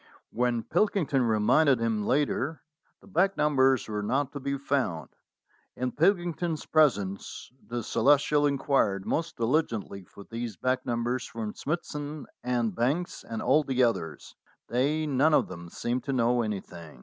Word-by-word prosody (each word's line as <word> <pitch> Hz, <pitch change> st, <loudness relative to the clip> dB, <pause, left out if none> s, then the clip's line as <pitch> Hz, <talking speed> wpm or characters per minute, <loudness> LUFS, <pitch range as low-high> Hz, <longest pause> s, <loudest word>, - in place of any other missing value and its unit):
When 120 Hz, -1 st, 0 dB
Pilkington 175 Hz, -7 st, +1 dB
reminded 120 Hz, +5 st, +3 dB
him 110 Hz, -3 st, -1 dB
later, 150 Hz, +3 st, 0 dB, 0.4 s
the -, -, -18 dB
back 195 Hz, +1 st, +1 dB
numbers 135 Hz, -4 st, +3 dB
were 105 Hz, -1 st, -3 dB
not 135 Hz, +6 st, 0 dB
to 145 Hz, -, -6 dB
be 140 Hz, +1 st, -2 dB
found. 130 Hz, -, -1 dB, 0.7 s
In 125 Hz, 0 st, -2 dB
Pilkington's 175 Hz, -, 0 dB
presence 105 Hz, -14 st, 0 dB, 0.2 s
the 120 Hz, -1 st, -3 dB
Celestial 145 Hz, +4 st, +3 dB
inquired 135 Hz, -8 st, +1 dB
most 165 Hz, +1 st, -2 dB
diligently 115 Hz, -6 st, -1 dB
for 100 Hz, -, -13 dB
these 115 Hz, -2 st, -6 dB
back 130 Hz, +5 st, -1 dB
numbers 120 Hz, +1 st, -1 dB
from 110 Hz, -2 st, -5 dB
Smithson 150 Hz, -2 st, -4 dB, 0.2 s
and 120 Hz, -3 st, 0 dB
Banks 140 Hz, -, -1 dB
and 115 Hz, -1 st, -5 dB
all 150 Hz, +5 st, +4 dB
the 130 Hz, -2 st, +1 dB
others. 115 Hz, -9 st, -2 dB, 0.3 s
They 145 Hz, +6 st, +1 dB
none 150 Hz, +2 st, +3 dB
of -, -, +2 dB
them 85 Hz, -2 st, -9 dB
seemed 120 Hz, +7 st, -3 dB
to 140 Hz, -, -1 dB
know 120 Hz, -1 st, +2 dB
anything. 95 Hz, -, -6 dB
130 Hz, 145 wpm, -28 LUFS, 115-150 Hz, 0.7 s, all